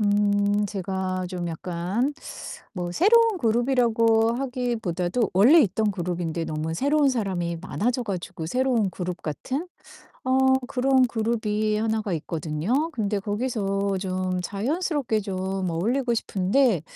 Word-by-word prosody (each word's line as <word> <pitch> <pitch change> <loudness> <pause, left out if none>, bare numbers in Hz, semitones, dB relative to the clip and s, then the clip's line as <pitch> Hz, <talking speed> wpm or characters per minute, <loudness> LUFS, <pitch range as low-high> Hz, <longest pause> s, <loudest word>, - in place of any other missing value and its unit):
음 205 0 +2
제가 190 -2 -3
좀 180 -2 -4
약간 180 - -2 0.6
뭐 175 -3 -4
새로운 445 - +4
그룹이라고 230 -2 +3
하기보다도 235 -6 -1
원래 245 - +7
있던 215 -3 +1
그룹인데 175 -2 -3
너무 155 +1 -3
새로운 285 - +3
사람이 185 -8 -1
많아져 240 +7 -1
가지고 185 -5 -5
새로운 245 -1 +1
그룹 180 0 -5
같은 265 - -4 0.6
어 260 0 +2 0.3
그런 265 0 +3
그룹이 215 -2 0
하나가 220 -1 -1
있거든요. 165 - -1
근데 210 -7 -1
거기서 200 -2 -1
좀 185 -1 -2
자연스럽게 260 - -1
좀 190 -1 -3
어울리고 235 +10 0
싶은데 205 - +2
210 Hz, 285 characters per minute, -25 LUFS, 185-245 Hz, 0.6 s, 원래